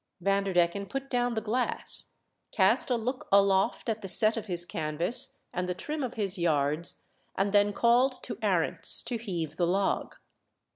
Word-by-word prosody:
Vanderdecken 195 0 +1
put 270 0 -6
down 245 -1 0
the 220 - -1
glass, 235 +4 -2 0.4
cast - - +3
a 250 - +2
look 245 +3 -4
aloft 195 +3 +3
at 220 -1 -2
the 195 - -6
set 215 +4 +3
of 225 -2 -5
his 175 -2 +2
canvas 175 - 0 0.2
and 180 0 -3
the 180 - -2
trim 300 +10 -5
of 255 -2 -4
his 200 -4 -3
yards, 155 0 0 0.3
and 195 +1 0
then 205 0 +3
called 240 +5 +3
to - - -5
Arents - - +2
to 240 -2 -3
heave 170 -8 -5
the 175 - +1
log. 195 +3 -1
200 Hz, 165 wpm, -28 LUFS, 180-235 Hz, 0.4 s, cast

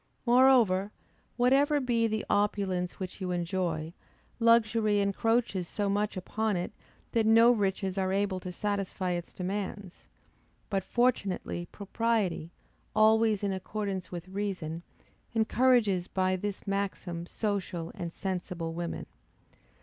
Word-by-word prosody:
Moreover, 240 -6 +5 0.5
whatever 275 +4 +4
be 235 -3 +1
the 220 0 -2
opulence 200 -3 0
which 185 +1 -6
you 185 - -2
enjoy, 175 -2 -2 0.5
luxury 225 -2 +4
encroaches 200 -1 +1
so 205 +2 -2
much 205 0 0
upon 210 +2 -1
it, 175 - -3 0.4
that 225 -2 +2
no 230 +2 +7
riches 195 -3 0
are 190 0 0
able 195 -1 0
to 180 0 -6
satisfy 195 -1 -2
its 175 -1 -3
demands; 195 0 -5 0.6
but 195 -2 0
fortunately 195 -6 0
propriety, 205 -5 -1 0.5
always 220 -1 +4
in 200 -1 0
accordance 190 -1 -4
with 175 0 -6
reason, 185 -5 -3 0.5
encourages 220 -5 +3
by 185 0 +1
this 200 +2 -4
maxim 195 -4 -3
social 190 -6 -3
and 170 -1 -5
sensible 180 -3 -4
women. 170 0 -4
200 Hz, 120 wpm, -29 LUFS, 185-220 Hz, 0.6 s, no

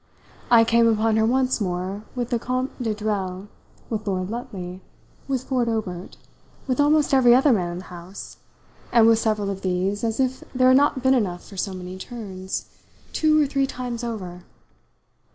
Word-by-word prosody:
I 235 -2 +7
came 230 0 +4
upon 220 0 +2
her 220 0 +3
once 255 0 +1
more 190 +2 -3
with 245 -1 -3
the 240 - +1
Comte 255 +2 -3
de 220 -3 -1
Dreuil, 200 -3 -3 0.4
with 215 -2 -4
Lord 185 0 -1
Lutley, 190 -6 -6 0.5
with 265 -2 -1
Ford 250 -3 0
Obert, 195 -5 -4 0.5
with 255 -1 -1
almost 295 0 +3
every 245 -3 +6
other 265 +1 +5
man 175 -5 -1
in - - -5
the 185 - -7
house, 180 +1 -10 0.5
and 230 -2 +6
with 225 0 +5
several 215 -3 0
of 195 -1 -6
these, 190 +3 -1
as 225 +1 -1
if 260 0 0
there 255 0 +5
had 260 - +7
not 280 -2 +2
been 260 0 +5
enough 190 -8 -1
for 200 - -12
so 195 +1 -2
many 185 0 -7
turns, 190 -5 -6 0.5
two 310 -1 +3
or 300 - +4
three 275 -1 0
times 245 -2 -5
over. 185 -7 -5
225 Hz, 180 wpm, -23 LUFS, 190-255 Hz, 0.5 s, I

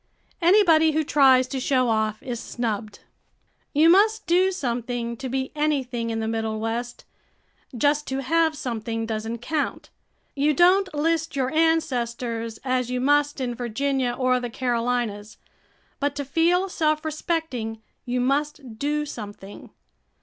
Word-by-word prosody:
Anybody 335 -4 +5
who 315 +1 +1
tries 265 -3 +5
to 270 - -3
show 255 -1 +1
off 220 -1 0
is 245 -3 -4
snubbed. 220 -4 -4 0.7
You 305 +3 +4
must 420 +6 +4
do 365 +2 +3
something 240 -6 -3
to 265 +1 -5
be 265 +1 -2
anything 265 -6 -1
in 225 0 -2
the 220 - -2
Middle 220 -1 -2
West; 235 +2 -4 0.7
just 295 +3 +1
to 270 +1 -3
have 320 +2 +2
something 225 -3 -3
doesn't 225 +1 -4
count. 305 +3 -3 0.4
You 290 +1 +2
don't 370 +3 +4
list 320 +1 0
your 265 0 -1
ancestors 240 -8 0
as 255 -1 0
you 250 0 -1
must 290 +2 +2
in 250 -2 -2
Virginia 245 +2 -1
or 255 -1 +2
the 245 -1 -4
Carolinas, 235 -3 -2 0.6
but 285 0 -1
to 285 -1 -4
feel 340 +6 +2
self 310 -3 0
respecting 305 -8 -3 0.2
you 250 +1 -2
must 275 -2 -2
do 295 +1 -1
something. 205 -6 -9
260 Hz, 140 wpm, -24 LUFS, 235-305 Hz, 0.7 s, Anybody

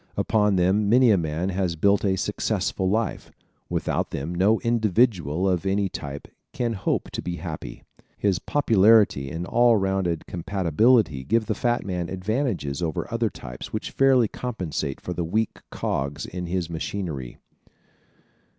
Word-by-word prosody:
Upon 105 -2 +2
them 95 +3 +2
many 125 +1 +6
a - - +6
man 80 +2 -2
has 90 -2 -1
built 100 +5 +3
a 95 -2 +2
successful 95 +1 -1
life. 110 +3 -1 0.4
Without - - -1
them 80 +6 -4
no 100 +6 +3
individual 105 - +1
of 90 -2 +1
any 95 0 0
type 70 -3 -7 0.3
can 120 -2 -1
hope 95 - -2
to - - -4
be 90 - -4
happy. 80 -9 -7 0.3
His 95 -3 +1
popularity 110 - +4
and 85 +5 -4
all 120 +4 +4
around 95 -5 0
compatibility 95 - +2
give 115 - +1
the 110 - -1
fat 120 +2 0
man 90 -3 -3
advantages 95 - -2
over 80 -3 -2
other - - +1
types - - -9
which - - -4
fairly 130 -4 +4
compensate 90 - -4
for 90 - -5
the 85 - -2
weak 110 +7 -1
cogs 70 +2 -3
in 90 -1 -6
his 90 -1 -1
machinery. 80 -6 -5
95 Hz, 150 wpm, -24 LUFS, 85-110 Hz, 0.4 s, many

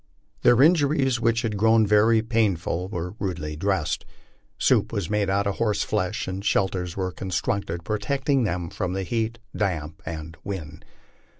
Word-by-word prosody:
Their 120 +2 +6
injuries, 145 -6 +3
which 115 -1 +1
had 110 -3 -1
grown 110 +1 +4
very 110 +2 +4
painful, 95 -6 0
were 90 -2 -4
rudely 85 -6 -3
dressed. 95 -1 -1 0.5
Soup - - +2
was 100 -2 -3
made 105 -2 +1
out 100 +1 +1
of 100 -1 -1
horse 105 -3 +1
flesh, - - -1
and 95 +1 -4
shelters 95 -3 0
Trere 95 -1 -2
constructed 95 -2 -2
protecting 135 - 0
them 90 -5 -2
from 90 -3 -2
the 95 0 -2
heat, 115 +3 -1 0.2
damp, 80 -5 -2
and 80 0 -7
wind. 80 -6 -6
100 Hz, 155 wpm, -25 LUFS, 90-115 Hz, 0.5 s, Their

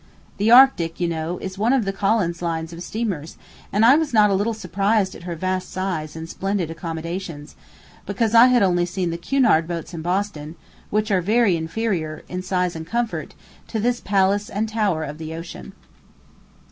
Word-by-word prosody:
The 210 +3 +1
Arctic, 235 -10 +6
you 175 - +1
know, 165 +1 -3
is 190 0 -7
one 230 +5 +3
of 255 -6 +2
the 195 - -2
Collins 195 -4 0
line 165 -2 -1
of 170 0 -9
steamers, 185 -6 -4 0.3
and 210 +3 +3
I 255 +4 +8
was 315 -6 -1
not 210 -1 +5
a - - +3
little 210 +4 0
surprised 200 0 0
at 175 - -11
her 170 - -3
vast 185 +2 -2
size 175 -5 -3
and 160 0 -6
splendid 195 -2 -2
accommodations, 165 -1 -6 0.5
because 215 +3 0
I 235 +2 +8
had 250 -4 +4
only 175 -2 +2
seen 180 -1 -2
the 170 - -4
Cunard 220 -6 +2
boats 170 0 -5
in 165 - -5
Boston, 175 -3 -2 0.3
which 215 +1 0
are 190 -2 +3
very 210 0 +3
inferior, 165 -2 -3
in 180 0 -4
size 180 -2 -1
and 160 0 -7
comfort, 235 +1 -3 0.3
to 225 - -3
this 240 +2 0
palace 200 +1 +1
and 215 +3 -2
tower 210 -7 0
of 150 +1 -7
the 160 0 -6
ocean. 160 - -8
185 Hz, 185 wpm, -22 LUFS, 165-215 Hz, 0.5 s, I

